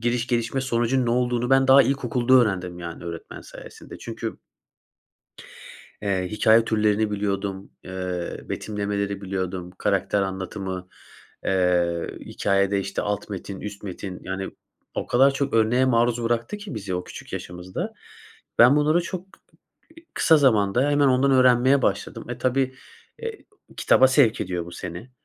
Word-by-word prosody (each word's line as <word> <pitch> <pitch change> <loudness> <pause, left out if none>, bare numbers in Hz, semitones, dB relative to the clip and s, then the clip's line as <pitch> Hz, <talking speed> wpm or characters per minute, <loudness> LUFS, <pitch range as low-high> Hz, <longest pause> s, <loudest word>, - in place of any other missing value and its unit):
giriş, 120 +1 0
gelişme, 120 +2 0
sonucunun 125 0 +1
ne - - +1
olduğunu 125 0 0
ben 135 0 +4
daha 135 +1 +8
ilkokulda 130 -2 +1
öğrendim, 95 -8 +2
yani, 85 0 -7
öğretmen 85 -1 -7
sayesinde. - - -12
Çünkü - - -6 1.6
Eee, 95 -3 -1
hikâye 110 +1 +4
türlerini 105 -1 +1
biliyordum, 100 -1 -3
eee, 90 -1 -4
betimlemeleri 100 -1 -3
biliyordum, 95 -2 -4
karakter 100 0 +1
anlatımı, 95 -1 -5 0.6
eee, 90 -2 +1
hikâyede, 100 0 0
işte, 95 0 -3
alt 105 0 -3
metin, 100 0 -6
üst 105 0 -7
metin. 95 -1 -7
Yani, 95 +1 -4 0.4
o - - -3
kadar 135 +3 +5
çok 135 -1 -1
örneğe 115 +3 +3
maruz 120 -1 +2
bıraktı 115 - -1
ki 205 - -8
bizi 100 -4 -4
o 90 0 -3
küçük - - -11
yaşımızda, 90 +1 -5 0.7
ben 125 +4 +7
bunları 155 +4 +3
çok 185 +2 -7
k - - -21 0.6
eee, 330 - -14
kısa 160 - +5
zamanda 125 -1 +3
hemen 145 -1 +3
ondan 135 +1 +3
öğrenmeye 130 +1 +5
başladım. 100 +3 -2
E, 120 - -4
tabii, 130 +1 0 0.4
eee, 460 -2 -7 0.3
kitaba 130 - +5
sevk 130 -4 +3
ediyor 90 -2 -3
bu 85 - -10
seni. 90 +9 -8
110 Hz, 145 wpm, -24 LUFS, 95-130 Hz, 1.6 s, daha